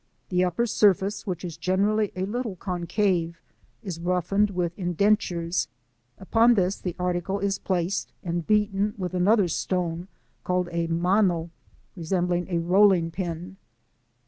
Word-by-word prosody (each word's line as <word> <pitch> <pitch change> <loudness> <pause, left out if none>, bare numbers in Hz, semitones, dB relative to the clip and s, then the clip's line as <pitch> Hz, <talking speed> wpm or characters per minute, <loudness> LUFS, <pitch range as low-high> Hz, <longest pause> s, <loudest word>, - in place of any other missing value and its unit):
The 180 -1 +2
upper 180 +6 0
surface, 205 -1 +2
which 180 -1 -3
is 170 -3 -6
generally 205 +3 +1
a 185 0 -1
little 225 0 -3
concave, 175 -1 -1 0.4
is 180 -5 -5
roughened 180 +4 +1
with 180 -3 -2
indentures; 180 -2 0 0.5
upon 230 +5 +4
this 190 -1 +1
the 180 -3 -5
article 180 +1 -1
is 200 -1 -1
placed 185 0 -1
and 170 -2 -3
beaten 210 -1 +1
with 185 -2 -4
another 190 +2 +3
stone 175 0 -2 0.4
called 180 -1 0
a 170 0 -1
mano, 175 0 +1 0.4
resembling 175 0 -1
a 175 - 0
rolling 180 0 +4
pin. 180 +1 -5
180 Hz, 130 wpm, -25 LUFS, 175-200 Hz, 0.5 s, upon